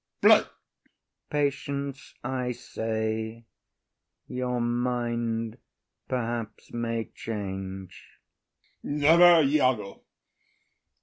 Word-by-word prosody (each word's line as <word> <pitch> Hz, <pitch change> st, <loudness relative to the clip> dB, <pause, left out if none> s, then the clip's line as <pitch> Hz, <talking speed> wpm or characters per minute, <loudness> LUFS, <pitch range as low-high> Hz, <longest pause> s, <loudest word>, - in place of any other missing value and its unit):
IAGO. -, -, +7 dB, 0.8 s
Patience, 140 Hz, -1 st, -2 dB
I 125 Hz, -1 st, -2 dB
say. 110 Hz, 0 st, -3 dB, 0.8 s
Your 125 Hz, -1 st, -2 dB
mind 120 Hz, -1 st, -1 dB, 0.5 s
perhaps 120 Hz, -3 st, -3 dB
may 115 Hz, -1 st, -2 dB
change. 95 Hz, -3 st, -6 dB, 0.6 s
OTHELLO. 145 Hz, -, -3 dB
Never, 165 Hz, +1 st, +7 dB
Iago. 130 Hz, -8 st, +1 dB
120 Hz, 65 wpm, -27 LUFS, 110-135 Hz, 0.8 s, IAGO